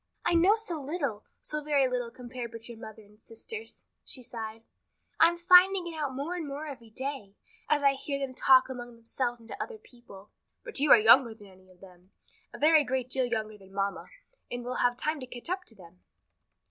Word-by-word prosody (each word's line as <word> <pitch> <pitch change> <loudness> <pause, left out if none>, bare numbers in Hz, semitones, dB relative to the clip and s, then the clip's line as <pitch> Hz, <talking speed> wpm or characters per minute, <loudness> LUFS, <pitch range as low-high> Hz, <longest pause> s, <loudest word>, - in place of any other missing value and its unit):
"I - - +3
know 355 +5 +5
so 360 -9 -4
little, 275 -7 -3 0.2
so 300 0 -4
very 285 -3 +3
little 250 -2 -2
compared 240 -1 -8
with 230 0 -9
your 235 -2 -10
mother 220 -1 -10
and 210 +1 -22
sisters," 445 - -8 0.2
she 255 - -3
sighed. 225 -1 -7 0.6
"I'm 335 +1 +5
finding 365 +1 +6
it 340 -1 -6
out 290 -4 -3
more 285 +6 -3
and 340 -4 -4
more 285 +2 -5
every 255 -6 -9
day, 260 -4 -6 0.3
as 295 -1 +2
I 275 -1 +5
hear 275 +1 -4
them 275 -2 -4
talk 260 0 +5
among 245 -2 -8
themselves 240 +1 -3
and 230 - -17
to - - -4
other 465 - -9
people." 240 - -16 0.3
"But 475 - -2
you 290 +1 +2
are - - +10
younger 230 +1 +6
than 210 -2 -15
any 185 0 -20
of 180 -1 -22
them, 185 0 -17 0.4
a - - -9
very 310 0 +5
great 255 -1 -2
deal 260 -1 +2
younger 215 -3 -3
than 195 0 -17
mamma, 200 0 -2 0.4
and 245 0 -5
will 250 - -3
have 245 0 +2
time 305 +3 -2
to 255 - -8
catch 245 +7 -7
up 370 -1 -2
to 225 - -12
them." 180 -2 -17
255 Hz, 210 wpm, -29 LUFS, 225-300 Hz, 0.6 s, are